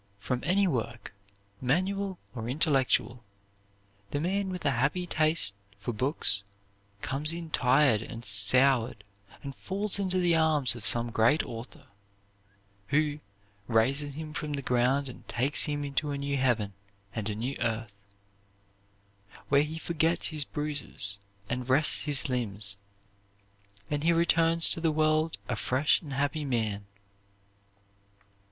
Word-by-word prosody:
From 125 +5 -4
any 190 +6 +2
work, 120 - -4 0.5
manual 190 +8 -1 0.2
or 115 -2 -6
intellectual, 130 -4 +1 0.9
the 145 - -3
man 190 +4 -2
with 180 -1 -7
a 140 - +3
happy 140 +9 -1
taste 155 - +2 0.2
for 110 +4 -5
books 110 - +2 0.6
comes 150 +4 +2
in 165 -1 -7
tired 130 -4 +3
and 115 +1 -8
soured 120 +3 +4 0.4
and 140 -1 -7
falls 200 +4 -1
into 185 -2 -1
the 175 -2 +2
arms 155 -5 +3
of 115 -2 -2
some 120 0 +5
great 120 +8 +2
author, 115 +1 -10 1.0
who 150 +2 0 0.5
raises 135 +5 +1
him 155 0 -8
from 150 -2 -5
the 140 -1 -4
ground 125 +3 +1
and 125 - -12
takes 135 +5 +2
him 145 -1 -3
into 145 +2 -2
a 140 - -3
new 140 0 -3
heaven 120 -7 0 0.4
and 110 -2 -4
a 105 - -4
new 125 +6 -4
earth, 115 -1 -3 1.6
where 140 0 +4
he 155 +2 -4
forgets 165 0 -1
his 155 -3 -1
bruises 145 -10 -2 0.3
and 125 +2 -5
rests 145 +4 +4
his 145 -2 +6
limbs, 105 -6 0 1.2
and 145 0 -2
he 170 - +3
returns 165 0 +3
to 165 - +2
the 165 -1 +1
world 155 +1 0
a 120 - -2
fresh 130 +6 +1
and 145 -5 -9
happy 145 +3 -2
man." 110 -7 -3
140 Hz, 135 wpm, -28 LUFS, 120-155 Hz, 1.6 s, his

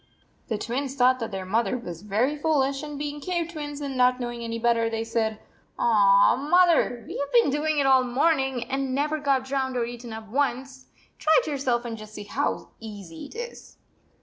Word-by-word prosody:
The 220 - -1
Twins 260 +5 -3
thought 255 -1 +4
that 225 - -3
their 190 -2 -5
mother 230 +6 0
was 175 -8 -8
very 215 +8 0
foolish, 280 -3 +1
and, 295 -1 -6
being 290 0 -4
cave 340 0 -2
twins, 295 -2 -6
and 275 -2 -4
not 250 0 +3
knowing 240 -1 -4
any 230 0 -3
better, 230 -1 +2
they 225 0 -2
said: 225 -1 -1 0.4
"Aw, 200 -3 +5
mother, 305 -5 +3
we - - -6
have 285 - -3
been 470 - +4
doing 300 +2 0
it 280 - +2
all 265 -1 +6
the 250 - -4
morning, 265 -2 +1
and 265 +1 -2
never 300 +2 0
got 275 -3 +1
drowned 265 -1 -1
or 235 - +1
eaten 240 0 -8
up 220 0 -8
once! 265 +1 -2 0.3
Try 315 0 +4
it - - -8
yourself 260 -5 -1
and 225 -2 -5
just 215 0 -11
see 210 - -6
how 240 +8 -2
easy 200 -7 -9
it - - -15
is." 475 +1 -8
255 Hz, 200 wpm, -25 LUFS, 230-285 Hz, 0.4 s, all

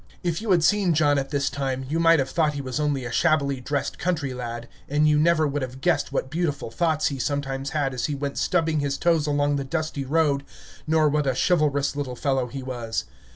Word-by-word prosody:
If 170 0 -1
you 225 - -5
had 175 -4 +4
seen 190 -1 +3
John 145 -2 +3
at 135 0 -4
this 140 -2 0
time, 135 -2 -2
you 160 +4 -1
might 165 0 +5
have 135 -2 -1
thought 155 -3 +1
he 140 - -3
was 130 +2 -3
only 145 -4 0
a 120 - -5
shabbily 140 -1 +1
dressed 145 +3 -3
country 155 -7 -1
lad, 120 -1 -6 0.2
and 150 +2 +3
you 150 -1 +4
never 160 0 +3
would 145 0 -1
have 130 0 -5
guessed 170 0 +1
what 135 -1 -2
beautiful 155 -7 -2
thoughts 160 +2 +1
he 140 -2 -5
sometimes 135 0 -2
had 140 -3 -1
as 125 - -1
he 145 - -2
went 140 0 -3
stubbing 160 -3 +1
his 140 -1 -1
toes 165 -3 +2
along 145 0 +1
the 140 - -2
dusty 155 0 -3
road, 145 0 +1 0.4
nor 155 0 +3
what 150 -1 +1
a 130 - +1
chivalrous 145 -4 +1
little 140 -3 -3
fellow 135 -1 0
he 135 +2 -7
was. 120 -3 -3
145 Hz, 225 wpm, -24 LUFS, 135-155 Hz, 0.4 s, might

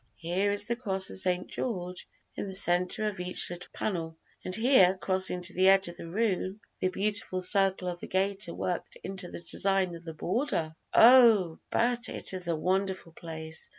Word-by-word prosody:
here 180 - -1
is 205 0 +1
the 235 - -1
Cross 195 -6 0
of - - -4
St. 180 -1 +2
George 180 -6 -5 0.3
in - - -5
the 190 - -4
centre 180 +2 +3
of 200 -3 -5
each 180 0 0
little 175 0 -8
panel, 165 -5 -4 0.3
and 185 - -2
here 220 -6 +4
crossing 185 -2 +2
to 180 +1 0
the 185 +1 +3
edge 195 0 +4
of 175 - -8
the 165 - -9
room 195 0 -1 0.2
the - - +1
beautiful 200 -1 -2
circle 190 0 +1
of 175 -1 -4
the - - -8
gaiter 195 -1 -1
worked 180 -1 -4
into 190 -1 -5
the - - -9
design 190 -1 0
of 170 0 -10
the 165 -2 -8
border. 170 - -2 0.2
Oh, 225 -9 +6
but 240 0 +1
it - - -3
is 180 -2 -2
a 170 - 0
wonderful 185 +1 -2
place! 160 -1 -7
185 Hz, 185 wpm, -28 LUFS, 175-200 Hz, 0.3 s, Oh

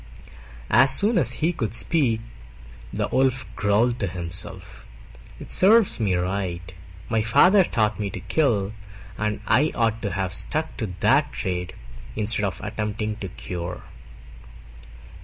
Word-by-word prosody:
As 135 +4 +6
soon 205 - +2
as - - +1
he 175 - +2
could 110 - -3
speak 120 -7 +1 0.7
the - - -1
Wolf 130 -1 +1
growled 115 +4 +2
to 100 - -1
himself, 85 -1 -6 0.5
"It - - -10
serves 210 - +5
me 100 -5 +1
right: 90 -1 -3 0.3
my 110 - +1
father 185 - +5
taught 110 -9 0
me 105 -1 -2
to 95 - -6
kill, 105 - 0 0.4
and 105 0 -2
I 135 +9 +3
ought 115 -1 0
to 100 - -2
have 95 -1 -2
stuck 155 +10 -1
to 110 - -2
that 145 +2 +3
trade 90 -3 -3 0.4
instead 105 0 +2
of 95 - -3
attempting 105 0 -3
to 100 - -5
cure." 90 -1 -6
110 Hz, 140 wpm, -24 LUFS, 95-130 Hz, 0.7 s, As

